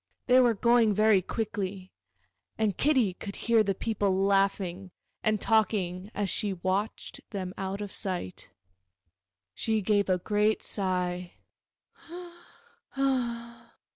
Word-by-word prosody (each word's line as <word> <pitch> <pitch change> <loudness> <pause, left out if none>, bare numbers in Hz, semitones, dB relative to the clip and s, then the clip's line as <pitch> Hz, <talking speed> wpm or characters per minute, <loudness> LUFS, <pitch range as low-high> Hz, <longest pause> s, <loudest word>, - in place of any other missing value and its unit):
They 250 +1 +6
were 240 -3 +4
going 235 -1 +4
very 215 -2 +4
quickly, 195 -2 -4 0.7
and 215 -4 +1
Kitty 260 -9 +2
could 200 +2 -8
hear 230 -1 +3
the 200 -2 0
people 195 -3 0
laughing 195 -2 +1 0.3
and 215 -1 +2
talking 200 -4 +1
as 205 -1 0
she 205 +1 0
watched 190 +4 -3
them 185 -3 -5
out 195 +1 -4
of 205 -2 -6
sight. 180 - -4 1.0
She 220 - 0
gave 205 0 +2
a 185 - +3
great 210 +3 +1
sigh. 180 -2 -2
200 Hz, 110 wpm, -28 LUFS, 185-220 Hz, 1.0 s, They